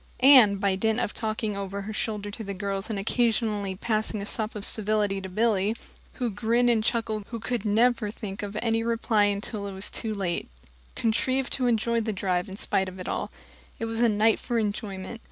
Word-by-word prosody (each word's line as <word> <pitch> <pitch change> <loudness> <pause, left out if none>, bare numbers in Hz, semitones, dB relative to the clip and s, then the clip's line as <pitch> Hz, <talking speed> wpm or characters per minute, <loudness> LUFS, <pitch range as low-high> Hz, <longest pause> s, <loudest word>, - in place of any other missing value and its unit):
Anne, 255 -7 +8
by 195 0 +1
dint 220 +4 +1
of 235 - -1
talking 215 -2 -2
over 200 0 -4
her 215 +2 -5
shoulder 210 -1 -2
to 220 - -7
the 200 -1 -5
girls 195 +1 -3
and 215 - -2
occasionally 215 -2 0
passing 215 +1 -1
a 200 - -4
sop 215 +1 -2
of 210 0 -5
civility 210 -2 0
to 190 - -6
Billy 210 +1 +1 0.4
who 245 -4 -2
grinned 235 +4 +2
and 220 -2 +2
chuckled 220 -2 -1
and 230 -1 -3
never 225 +1 +3
could 205 - -7
think 200 -3 -6
of 205 0 -5
any 225 -1 +1
reply 225 -2 +2
until 205 0 -2
it 200 - -6
was 190 +1 +1
too 220 -2 -3
late 180 - -2 0.5
contrived 255 +3 0
to 255 -2 0
enjoy 235 0 +1
the 220 0 -1
drive 185 -2 -1
in 190 - -8
spite 190 -2 0
of 185 0 -11
all. - - -2 0.5
It 230 - -3
was 225 0 -2
a 240 - +5
night 215 +1 +3
for 240 -2 -2
enjoyment. 210 0 -3
215 Hz, 200 wpm, -27 LUFS, 200-230 Hz, 0.5 s, Anne